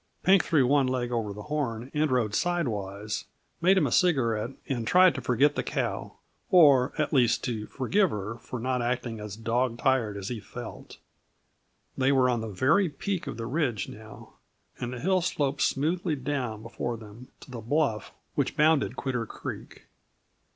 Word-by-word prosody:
Pink 190 0 +5
threw 145 -6 +3
one 140 +1 +3
leg 125 -1 -1
over 115 -4 -1
the 105 +1 -8
horn 130 -5 -3
and 150 0 +1
rode 120 -5 +1
sidewise, 105 - -2 0.4
made 190 +3 +5
him - - +3
a - - -1
cigarette, 120 -10 +2 0.2
and 120 -4 -2
tried 185 0 +6
to 135 - -5
forget 130 +4 +3
the - - -1
cow - - -3 0.3
or, 145 - +6
at 155 0 -1
least, 120 -3 +3
to 110 -4 -3
forgive 185 +9 +1
her 105 0 -5
for 125 - -7
not 125 +1 -1
acting 120 -2 -2
as 105 -1 -6
dog 115 +2 0
tired 120 -6 +1
as 100 -1 -5
he 120 -3 -4
felt. 120 +2 -9 1.0
They 135 +1 +2
were 130 -2 +4
on 120 -2 -1
the 110 - -5
very 150 - +2
peak 180 +6 -4
of - - -5
the 115 - -4
ridge 125 -5 -1
now, 110 0 -12 0.5
and 120 - -3
the 125 - -6
hill 185 +6 +2
sloped 145 -4 -1
smoothly 160 +3 +1
down 130 -6 -3
before 115 +1 -4
them 110 +3 -12
to - - -13
the 120 -3 -6
bluff 120 -3 0 0.2
which - - -1
bounded 155 -1 +3
Quitter 125 -5 -2
Creek. - - -8
125 Hz, 175 wpm, -27 LUFS, 115-150 Hz, 1.0 s, tried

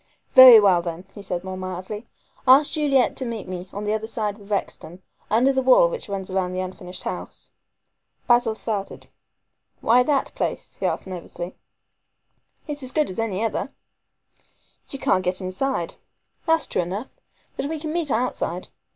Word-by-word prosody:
"Very 255 -3 +11
well, 190 -4 +4
then," 170 +1 -6
he 205 - -10
said 180 -3 -4
more 190 0 -5
mildly, 185 +4 -6 0.4
"ask 275 +3 +7
Juliet 280 -5 +2
to - - -2
meet 230 -5 -5
me 185 0 -6
on 205 - -5
the 210 0 0
other 220 0 -2
side 215 -2 -2
of 200 0 -15
Rexton, 190 -3 -3 0.3
under 250 +5 +3
the 265 - +1
wall 260 - +6
which 485 - -6
runs 195 -1 -4
round 185 -1 -1
the - - -2
unfinished 185 0 -6
house." - - -7 0.8
Basil 240 -2 +3
started. 210 -3 -5 0.7
"Why 240 +3 +4
that 275 +1 0
place?" - - -4
he - - 0
asked - - -2
nervously. 180 -1 -6 1.1
"It 295 -1 -4
is - - -5
as 260 -1 -1
good 305 -9 +1
as 185 - -6
any 220 -2 -1
other." 225 - -2 1.2
"You 275 - -6
can't 185 -7 +1
get 180 +1 +1
inside." 185 +1 -2 0.5
"That's 325 0 +3
true - - -1
enough. 195 +8 -5 0.5
But - - -3
we 315 +1 -4
can 310 0 -4
meet 335 -3 -1
outside. 220 -7 -2
215 Hz, 170 wpm, -23 LUFS, 185-260 Hz, 1.2 s, Very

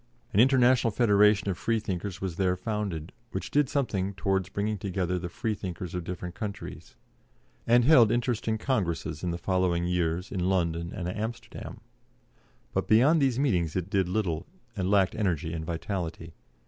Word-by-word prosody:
An 100 - +3
International 125 -1 +5
Federation 105 -2 +4
of 95 -3 -2
Freethinkers 100 -4 -2
was 95 -4 -4
there 90 -2 +2
founded, 95 -5 -3 0.2
which - - -5
did 145 -2 +3
something 100 -9 -1
towards 95 -1 0
bringing 105 +1 -2
together 90 -1 -1
the 90 0 -5
Freethinkers 90 -4 -4
of 90 -1 -3
different 90 0 -5
countries, 100 +1 -7 0.7
and 120 +1 +5
held 125 -7 +7
interesting 120 -2 0
congresses 85 - -2
in 90 - 0
the 85 - -2
following 90 -1 +1
years 90 +1 -1
in 90 -2 0
London 85 -2 0
and 90 -4 -4
Amsterdam; 110 +6 -6 0.9
but - - -1
beyond 140 +9 +5
these 130 -3 +2
meetings 90 - +1
it 95 +1 -2
did 95 -3 +1
little, 90 - -1 0.3
and 95 -3 -1
lacked 100 -2 +3
energy 85 -6 -1
and 80 -1 -4
vitality. 85 -1 -4
95 Hz, 155 wpm, -28 LUFS, 90-110 Hz, 0.9 s, held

